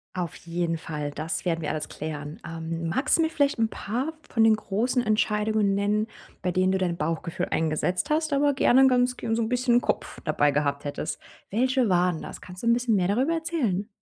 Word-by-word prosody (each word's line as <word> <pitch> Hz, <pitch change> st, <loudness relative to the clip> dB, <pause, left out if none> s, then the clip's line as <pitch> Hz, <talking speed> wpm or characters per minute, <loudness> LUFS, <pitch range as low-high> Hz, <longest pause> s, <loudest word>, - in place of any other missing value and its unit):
Auf 175 Hz, -3 st, -3 dB
jeden 170 Hz, -1 st, -1 dB
Fall. 150 Hz, -2 st, -4 dB
Das 155 Hz, +3 st, -3 dB
werden 165 Hz, -2 st, -1 dB
wir 150 Hz, -, -2 dB
alles 155 Hz, -, -3 dB
klären. 150 Hz, -1 st, -6 dB
Ähm, 165 Hz, 0 st, -4 dB
magst 265 Hz, -, +2 dB
du -, -, +2 dB
mir 320 Hz, -, +1 dB
vielleicht 285 Hz, -4 st, +1 dB
'n 225 Hz, -1 st, +2 dB
paar 255 Hz, +12 st, -3 dB, 0.2 s
von 225 Hz, -, +2 dB
den 220 Hz, -1 st, +6 dB
großen 225 Hz, +5 st, 0 dB
Entscheidungen 215 Hz, -1 st, +1 dB
nennen, 205 Hz, +2 st, +1 dB, 0.4 s
bei 180 Hz, -, +1 dB
denen 185 Hz, +1 st, +2 dB
du 190 Hz, -, +2 dB
dein 175 Hz, -2 st, -1 dB
Bauchgefühl 165 Hz, +3 st, -2 dB
eingesetzt 165 Hz, -, 0 dB
hast, 310 Hz, 0 st, +1 dB
aber 285 Hz, 0 st, +3 dB
gerne 265 Hz, 0 st, +5 dB
gan 250 Hz, -1 st, +4 dB
g 225 Hz, -, -2 dB
so 230 Hz, -, +1 dB
'n 220 Hz, -, -1 dB
bisschen 245 Hz, -1 st, +3 dB
Kopf -, -, -2 dB
dabei 145 Hz, -1 st, +2 dB
gehabt 140 Hz, -1 st, 0 dB
hättest. 145 Hz, +2 st, -4 dB, 0.3 s
Welche 255 Hz, +1 st, +2 dB
waren 180 Hz, -2 st, +2 dB
das? -, -, -8 dB
Kannst 180 Hz, 0 st, -10 dB
du 235 Hz, -, -2 dB
'n 235 Hz, -, +6 dB
bisschen 240 Hz, -2 st, +1 dB
mehr 180 Hz, -2 st, +2 dB
darüber 255 Hz, -, +1 dB
erzählen? 275 Hz, -, -1 dB
200 Hz, 205 wpm, -26 LUFS, 165-245 Hz, 0.4 s, den